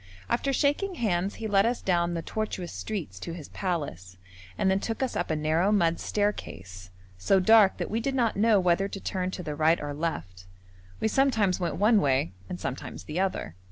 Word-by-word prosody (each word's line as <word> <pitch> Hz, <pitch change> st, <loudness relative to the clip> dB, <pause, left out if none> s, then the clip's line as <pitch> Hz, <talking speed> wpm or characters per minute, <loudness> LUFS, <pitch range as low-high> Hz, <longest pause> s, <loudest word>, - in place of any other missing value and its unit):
After 245 Hz, +4 st, +1 dB
shaking 295 Hz, +8 st, +1 dB
hands 195 Hz, -, 0 dB
he 225 Hz, -, -6 dB
led 200 Hz, -2 st, +4 dB
us 235 Hz, +2 st, 0 dB
down 175 Hz, -2 st, +1 dB
the 165 Hz, -, -3 dB
tortuous 200 Hz, -4 st, -4 dB
streets 165 Hz, -, -5 dB
to 170 Hz, -, -6 dB
his 155 Hz, -5 st, -9 dB
palace, 140 Hz, -, -4 dB, 0.4 s
and 190 Hz, -, +2 dB
then 190 Hz, -, +2 dB
took 225 Hz, +5 st, -3 dB
us 260 Hz, -, -2 dB
up 175 Hz, -, -1 dB
a 160 Hz, -, +1 dB
narrow 160 Hz, +6 st, +1 dB
mud 170 Hz, -5 st, +2 dB
staircase, 95 Hz, -, -3 dB, 0.3 s
so 190 Hz, -, +3 dB
dark 210 Hz, +1 st, +6 dB
that -, -, -4 dB
we 225 Hz, -, 0 dB
did 270 Hz, +3 st, -2 dB
not 235 Hz, -4 st, +1 dB
know 215 Hz, +1 st, +4 dB
whether 180 Hz, +1 st, +2 dB
to 200 Hz, -, -7 dB
turn 185 Hz, -1 st, -2 dB
to 185 Hz, -1 st, -6 dB
the 150 Hz, -, -4 dB
right 160 Hz, +3 st, +3 dB
or 145 Hz, -1 st, -4 dB
left; 95 Hz, -, -4 dB, 0.5 s
we -, -, +1 dB
sometimes 220 Hz, -6 st, +2 dB
went 175 Hz, -, -1 dB
one 210 Hz, +1 st, +4 dB
way 130 Hz, -, +1 dB, 0.2 s
and 90 Hz, -, -5 dB
sometimes 80 Hz, -, -5 dB
the 155 Hz, -, -4 dB
other. 185 Hz, -, -2 dB
185 Hz, 200 wpm, -27 LUFS, 155-215 Hz, 0.5 s, dark